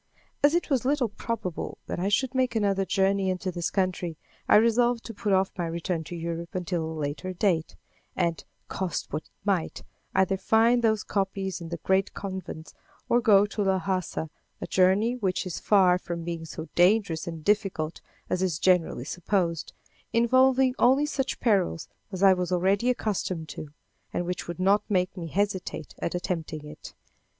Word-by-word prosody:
As 290 +3 +5
it 345 -3 -1
was 260 -4 +2
little 265 -3 +1
probable 205 -5 -4
that - - -4
I 190 +3 0
should 255 +5 +1
make 255 -2 +1
another 200 -3 +1
journey 195 0 +1
into 185 0 -2
this 175 -2 -2
country, 180 -4 -1 0.3
I - - +7
resolved 235 +2 +4
to 230 - -6
put 210 0 -2
off 190 0 +3
my 175 -2 -2
return 170 0 -2
to 175 - -7
Europe 170 +2 -5
until 175 -2 -1
a 160 - -4
later 150 +6 -3
date, 175 -4 0 0.4
and, 170 -3 0 0.2
cost 185 -6 -3
what 155 - -3
it - - -24 0.2
might, 190 -5 -1 0.3
either 190 0 +3
find 230 +4 +3
those 220 -2 +2
copies 195 -2 -2
in 165 - -7
the 170 - -4
great 190 +5 0
convents 190 -5 -6 0.4
or 240 - +4
go 205 -3 +6
to 210 +1 -4
Lhassa 190 -4 -1 0.3
a - - -4
journey 195 +6 +3
which 190 -6 -1
is 180 - -4
far 185 -3 +4
from 170 -2 -5
being 165 -1 -4
so 160 0 -7
dangerous 180 -3 +3
and 165 -2 -6
difficult 195 -6 0 0.3
as 180 - -1
is 180 -5 0
generally 175 -8 +2
supposed, 175 -1 -1 0.4
involving 255 +2 +4
only 265 +4 +5
such 270 -3 -2
perils 195 -7 +1 0.2
as 190 0 -3
I 195 -1 +8
was 180 -1 -2
already 195 +6 +2
accustomed 185 -9 -2
to, 150 - -7 0.4
and 175 - -2
which 180 0 -4
would 175 0 -6
not 195 +3 +4
make 185 -2 +1
me 170 -3 -5
hesitate 190 -3 -2
at 170 - -2
attempting 160 -4 -3
it. 150 0 -11
190 Hz, 175 wpm, -27 LUFS, 170-210 Hz, 0.4 s, I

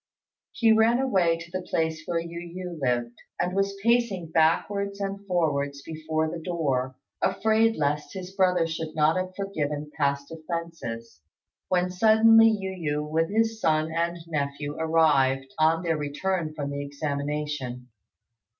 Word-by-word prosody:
He 225 -2 +3
ran 220 +2 +5
away 190 -11 +2
to 165 +1 -11
the 185 +1 -3
place 160 -2 -1
where 170 -1 0
Yu 170 0 -6 0.2
yü 180 -4 -6
lived, 120 -2 -1 0.2
and 180 +1 -1
was 195 0 0
pacing 230 -8 +1
backwards 200 +5 +1
and 200 0 -4
forwards 140 -6 0
before 160 0 -2
the 165 +1 -5
door, 140 -7 -1 0.3
afraid 225 +1 +2
lest 150 0 -1
his 185 -1 -6
brother 180 -3 +3
should 160 -1 -5
not 155 +1 +3
have 185 0 -3
forgiven 150 -7 -3
past 140 -1 -1
offences, 160 - -6 0.5
when 180 0 +1
suddenly 225 +3 +6
Yu 190 -8 -2
yü, - - -7
with 160 +2 0
his 225 +1 0
son 155 0 +2
and 170 +1 -1
nephew, 145 -2 -3
arrived, 140 -5 +2
on 160 +2 +3
their 165 -2 0
return 155 +3 -2
from 145 -2 -3
the 140 0 -3
examination. 140 -3 -4
165 Hz, 145 wpm, -26 LUFS, 145-185 Hz, 0.5 s, suddenly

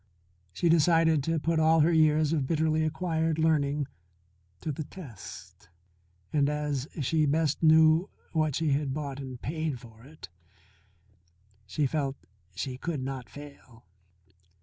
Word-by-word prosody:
She 170 - -1
decided 165 -1 +4
to 165 0 0
put 165 +1 0
all 160 0 +4
her 165 +3 +3
years 155 -1 +3
of 145 -5 0
bitterly 160 0 +1
acquired 160 0 -1
learning 150 -3 +1 0.8
to 155 - -3
the 150 +2 -4
test. 140 - -11 0.6
And 145 -2 +3
as 150 -2 -2
she 155 +3 +1
best 150 0 +1
knew 160 +2 +5 0.2
what 155 -4 0
she 160 -3 0
had 140 -1 0
bought 140 -3 -4
and 130 -3 -7
paid 155 -2 -3
for 115 -2 -15
it 150 - -12 1.4
she 145 +9 0
felt 140 -1 -1 0.4
she 130 +5 -4
could 155 -4 -3
not 130 -2 -5
fail. 140 -5 -13
150 Hz, 135 wpm, -28 LUFS, 140-160 Hz, 1.4 s, knew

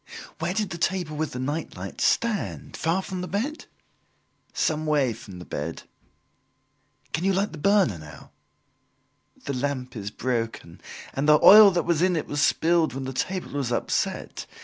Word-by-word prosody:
"Where - - -2
did 210 -3 -1
the 170 - -5
table 175 -4 -1
with 155 +1 -2
the - - -5
night 145 - -4
light 95 +1 -7
stand, 230 -3 0
far 170 +4 0
from 185 -2 -5
the 180 - -4
bed?" 255 +12 -3 0.9
"Some 155 0 -1
way 140 -6 +2
from 100 -4 -11
the 90 - -9
bed." 80 +3 -5 1.3
"Can 160 - -1
you 195 +1 +2
light 195 +2 0
the 160 - -9
burner 190 - +3
now?" 75 -1 -13 1.1
"The 140 - -2
lamp 130 -1 -3
is 105 -2 -4
broken 115 -7 -4 0.3
and 140 +3 0
the 150 - +8
oil 210 0 +10
that 175 -2 0
was 170 -2 +1
in 180 0 +3
it 155 - -1
was 145 -1 -2
spilled 165 -2 +2
when 135 - -4
the 130 0 -5
table 185 +8 -3
was 140 -4 -2
upset. - - -2
155 Hz, 170 wpm, -25 LUFS, 125-185 Hz, 1.3 s, oil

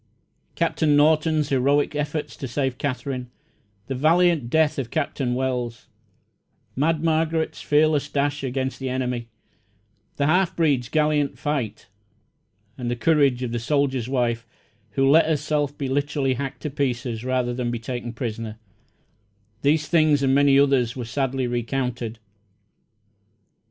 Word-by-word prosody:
Doctor 160 - 0
Norton's 150 +1 +3
heroic 140 +3 +2
efforts 150 +1 -3
to 135 - -5
save 130 0 -2
Katherine, 130 -2 -3 0.6
the 135 - -4
valiant 160 -1 +3
death 155 0 +2
of 125 -3 -3
Captain 135 -3 -1
Wells, 125 -4 -3 0.9
Mad 155 +3 +1
Margaret's 160 0 0
fearless 150 -1 +2
dash 145 0 -1
against 130 0 -2
the 135 -1 -3
enemy, 125 -2 -2 0.9
the 140 - 0
half 180 +4 +2
breed's 140 -7 +1
gallant 150 -2 +1
fight, 145 -7 -3 0.9
and 120 -1 -3
the 120 - -1
courage 140 -2 +2
of 120 - -3
the 120 - -2
soldier's 130 -1 0
wife, 120 -3 0 0.5
who 135 +4 +2
let 155 +3 +6
herself 150 -2 0
be 140 - -3
literally 140 0 0
hacked 135 +1 -5
to 150 - -3
pieces 125 -5 -2
rather 125 -1 0
than 120 -1 -2
be 120 - -2
taken 120 0 -5
prisoner 115 -2 -5 1.0
these 150 +1 +2
things 155 -4 +3
and 135 -1 +3
many 140 0 +5
others 135 -3 +2
were 125 -2 -5
sadly 135 +2 -1
recounted. 120 -1 -2
135 Hz, 135 wpm, -23 LUFS, 125-150 Hz, 1.0 s, let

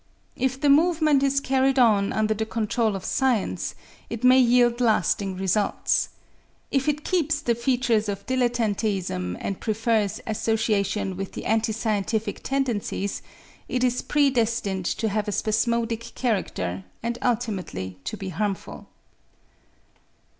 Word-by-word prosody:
If 260 +1 -1
the 290 - +1
movement 305 -1 +4
is 275 0 +2
carried 270 0 +1
on 215 -5 +4
under 220 0 +1
the 220 +1 -2
control 220 -1 0
of 190 - -6
science, 255 -7 0 0.3
it 230 +1 -5
may 255 +1 +7
yield 240 -1 +4
lasting 205 -4 +1
results. 195 +2 +1 0.6
If 270 +1 +1
it 300 0 -2
keeps 320 -4 +1
the 240 -5 +1
features 235 -3 +1
of 200 0 -4
dilettanteism 215 - -1
and 195 - -4
prefers 220 -2 0
association 210 -3 0
with 195 0 -5
the - - -6
antiscientific 220 -1 0
tendencies, 240 -7 -2 0.5
it 250 0 0
is 250 0 +1
pre 290 -2 +2
destined 225 -6 0
to 225 - -1
have 210 0 -1
a - - -1
spasmodic 230 +2 -1
character 95 - -2 0.2
and 235 +1 -2
ultimately 190 - -2
to 215 - -4
be 195 -1 -5
harmful. 195 +2 -4
225 Hz, 130 wpm, -25 LUFS, 205-250 Hz, 0.6 s, may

